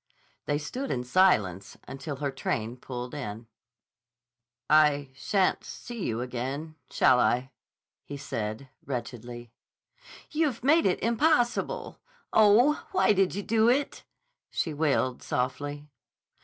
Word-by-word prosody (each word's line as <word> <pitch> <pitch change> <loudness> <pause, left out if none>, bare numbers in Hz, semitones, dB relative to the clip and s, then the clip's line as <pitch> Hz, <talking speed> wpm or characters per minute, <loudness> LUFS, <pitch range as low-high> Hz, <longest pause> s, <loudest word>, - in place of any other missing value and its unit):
They 145 - +1
stood 250 - -5
in 125 - -1
silence 110 - +2
until 140 +2 -6
her 140 0 -3
train 115 -3 -3
pulled 125 -1 -7
in. 115 -6 -6 1.2
"I 150 -3 +4
shan't 190 +7 +1
see 240 -5 -7
you 115 0 -2
again, 130 +6 -4 0.2
shall 130 -1 +4
I?" 125 +4 +1 0.5
he 145 - -7
said 125 -3 -4 0.2
wretchedly. 120 -2 -6 0.8
"You've 300 -7 0
made 315 +2 +4
it 180 - 0
impossible. 245 - +1 0.3
Oh, 220 +8 +5
why 370 - +4
did 190 -2 +1
you 200 - -3
do 225 +2 +3
it?" 275 +4 0 0.5
she 160 - -2
wailed 140 -4 0
softly. 145 +4 -3
145 Hz, 115 wpm, -28 LUFS, -, 1.2 s, Oh